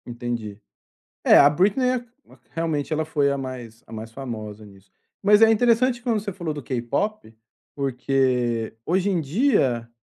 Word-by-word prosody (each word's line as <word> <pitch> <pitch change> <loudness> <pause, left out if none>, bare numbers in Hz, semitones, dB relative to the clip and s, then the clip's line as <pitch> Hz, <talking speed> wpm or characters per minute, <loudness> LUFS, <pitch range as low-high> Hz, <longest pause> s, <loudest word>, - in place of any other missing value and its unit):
Entendi. 120 -4 -5 0.7
É, - - +7
a 140 - +8
Britney 200 - +2
a 255 - -1
que 245 - -18 0.2
a - - -17
que - - -36
realmente 160 -1 -2
ela 155 0 0
foi 145 -3 +1
a 140 - -1
mais 125 -4 -8
a - - -15
mais 110 0 -7
famosa 110 -4 -7
nisso, 95 -1 -18 0.3
mas 205 +2 +5
é 225 - +7
interessante 240 +2 +2
quando 235 -3 0
você 200 -1 -5
falou 170 -4 -4
do 145 -1 -7
K-pop, 130 - -3 0.4
porque 125 -4 0
hoje 190 +3 +1
em 180 -3 +1
dia, 140 - +1
140 Hz, 175 wpm, -23 LUFS, -, 0.7 s, a